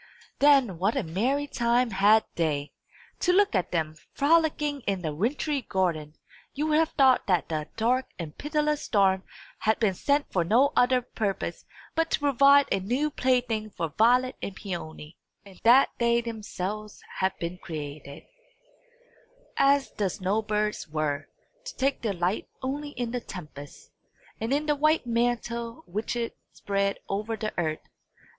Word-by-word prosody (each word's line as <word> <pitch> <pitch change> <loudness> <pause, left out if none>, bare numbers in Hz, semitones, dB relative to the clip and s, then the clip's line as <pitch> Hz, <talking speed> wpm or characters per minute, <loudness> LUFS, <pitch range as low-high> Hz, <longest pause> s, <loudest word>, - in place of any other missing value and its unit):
Then 270 - +4
what 200 +5 +1
a - - 0
merry 245 - 0
time 240 -2 +1
had 205 +3 +5
they! 150 -3 -1 0.5
To 360 - +2
look 400 -1 +3
at 185 -4 0
them, 160 -3 -1 0.2
frolicking 300 -1 +2
in 195 -3 -1
the 155 -2 -2
wintry 270 - -1
garden, 170 -8 -1 0.4
you 295 +2 -1
would 310 0 +3
have 325 0 +1
thought 265 -4 +4
that 180 -3 +1
the 155 -1 -2
dark 250 +4 +1
and 160 -4 -7
pitiless 300 0 -1
storm 195 -3 +2 0.4
had 220 +1 +2
been 215 -4 +2
sent 285 +9 +1
for 180 - +2
no 245 - +3
other 250 0 +3
purpose 210 -5 -3 0.3
but 325 0 0
to - - +1
provide 280 0 +5
a - - +2
new 250 +10 -1
plaything 245 -5 0
for 165 -5 -4
Violet 250 - +3
and 195 - -5
Peony; 165 -5 -7 0.3
and 195 -2 -15
that 245 +4 +6
they 235 0 +3
themselves 215 -2 -5 0.2
had 190 0 0
been 170 +1 -5
created, 145 -3 -7 1.3
as 275 0 +3
the 200 -3 -1
snow 190 +4 -1
birds 210 -3 -2
were, 155 -2 -2 0.4
to - - -7
take 275 +1 0
delight 190 -3 -1
only 285 +3 -3
in 245 -4 -4
the 245 0 -3
tempest, 150 -8 -10 0.5
and 225 +3 -3
in 290 +2 +1
the 300 -1 +2
white 305 0 +2
mantle 235 +2 -1
which 215 +6 -3
it 235 -1 -3 0.2
spread 200 0 -1
over 210 +3 -2
the 215 -1 -3
earth. 155 -2 -2
225 Hz, 155 wpm, -27 LUFS, 185-270 Hz, 1.3 s, that